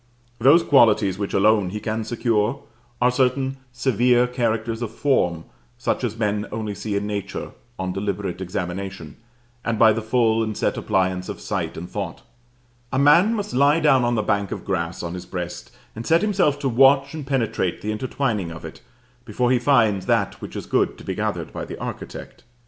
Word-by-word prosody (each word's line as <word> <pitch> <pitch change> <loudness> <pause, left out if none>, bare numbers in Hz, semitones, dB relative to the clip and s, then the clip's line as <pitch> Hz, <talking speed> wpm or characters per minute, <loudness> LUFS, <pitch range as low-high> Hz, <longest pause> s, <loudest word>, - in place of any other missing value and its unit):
Those 145 +8 +6
qualities 105 - +4
which 100 - -2
alone 105 -1 +3
he 105 +3 -4
can 110 +1 -2
secure 115 +2 0 0.4
are 125 +1 +4
certain 130 +1 +1
severe 125 0 +3
characters 115 -2 -1
of 120 - -2
form, 90 - 0 0.3
such 130 +1 -1
as 115 -2 -2
men 105 -2 -1
only 110 -1 -3
see 100 +1 -4
in 100 +1 -1
nature 100 -1 -4 0.3
on 95 -1 -3
deliberate 95 -2 -3
examination, 90 -2 -5 0.5
and 115 -1 -1
by 110 0 +6
the 115 - -2
full 115 0 +2
and 110 -2 -2
set - - 0
appliance 95 -1 0
of - - -6
sight - - -3
and 85 - -6
thought: - - -5 0.7
a 135 - -1
man 170 +11 +5
must 205 -1 -4
lie 140 +4 +4
down 145 -5 +4
on 120 0 +1
the 110 - 0
bank 100 -1 0
of - - -5
grass 85 -1 -2
on 85 0 -4
his 90 0 -7
breast 90 -2 -6 0.3
and 115 +1 -6
set 165 +4 +4
himself 190 -9 +2
to 145 - -2
watch 135 +3 +4
and 150 -4 -6
penetrate 120 -9 -1
the 105 - -1
intertwining 110 -4 -2
of 85 0 -9
it, - - -10 0.4
before 120 +2 0
he 125 - +3
finds 115 -7 +2
that - - 0
which - - -8
is - - -5
good - - +1
to - - -12
be - - -3
gathered - - -3
by - - -5
the - - -8
architect. - - -7
110 Hz, 190 wpm, -23 LUFS, 100-130 Hz, 0.7 s, Those